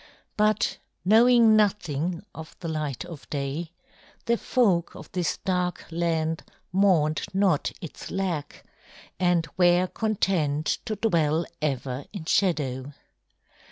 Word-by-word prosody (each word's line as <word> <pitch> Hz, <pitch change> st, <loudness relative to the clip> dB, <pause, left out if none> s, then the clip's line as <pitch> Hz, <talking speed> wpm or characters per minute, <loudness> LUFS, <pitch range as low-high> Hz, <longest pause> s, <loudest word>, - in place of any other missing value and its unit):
But 215 Hz, 0 st, +1 dB, 0.3 s
knowing 230 Hz, +2 st, +6 dB
nothing 180 Hz, -5 st, 0 dB
of 160 Hz, 0 st, -10 dB
the 170 Hz, -, -5 dB
light 155 Hz, -2 st, -3 dB
of 170 Hz, -5 st, -11 dB
day, 145 Hz, +4 st, -3 dB, 0.5 s
the 235 Hz, -, +3 dB
folk 200 Hz, -9 st, +1 dB
of -, -, -11 dB
this 175 Hz, -3 st, -1 dB
dark 180 Hz, -2 st, -1 dB
land 165 Hz, -1 st, 0 dB, 0.3 s
mourned 175 Hz, -5 st, +3 dB
not 190 Hz, -6 st, +2 dB
its 165 Hz, -, -8 dB
lack 175 Hz, -7 st, -3 dB, 0.5 s
and 175 Hz, -2 st, +2 dB
were 175 Hz, 0 st, +5 dB
content 180 Hz, -8 st, 0 dB
to 220 Hz, -3 st, -2 dB
dwell 165 Hz, -6 st, +1 dB, 0.2 s
ever 135 Hz, -2 st, -2 dB
in 195 Hz, -6 st, -7 dB
shadow. 145 Hz, -8 st, 0 dB
170 Hz, 115 wpm, -26 LUFS, 155-195 Hz, 0.5 s, knowing